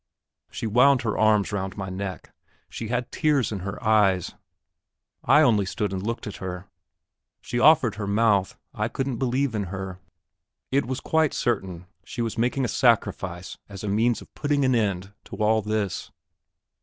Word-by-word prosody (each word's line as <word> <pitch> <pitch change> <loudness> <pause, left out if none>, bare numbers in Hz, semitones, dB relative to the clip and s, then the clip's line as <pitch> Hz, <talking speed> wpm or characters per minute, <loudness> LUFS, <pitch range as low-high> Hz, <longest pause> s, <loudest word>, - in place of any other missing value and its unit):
She - - -5
wound 125 +4 +4
her 110 -3 -1
arms 110 -2 +3
round 95 -1 -3
my 95 -1 -4
neck; 95 0 -6 0.4
she 115 - -6
had 125 +2 -2
tears 145 -8 +1
in 105 - -3
her 95 +1 -5
eyes; 105 -5 +3 0.9
I - - +6
only 105 -4 +4
stood 105 0 -2
and 95 - -3
looked 115 +4 -3
at 105 - -6
her. 90 0 -6 0.7
She 120 - -3
offered 145 -6 +5
her 100 - -3
mouth; 100 -2 +2 0.2
I 110 -3 -1
couldn't 130 0 -3
believe 130 +1 0
in 105 -2 -1
her; 95 0 -6 0.7
it 140 -2 +1
was 130 0 -3
quite 160 -2 +1
certain 95 -7 -2 0.2
she 120 - -4
was 115 - -3
making 125 +3 0
a - - 0
sacrifice 100 -8 0
as 100 0 -9
a - - -3
means 115 +4 +1
of - - -22
putting 145 -2 0
an 130 - +3
end 100 -4 -1
to - - -8
all 110 +1 +2
this. 105 -2 -2
110 Hz, 170 wpm, -25 LUFS, 95-125 Hz, 0.9 s, I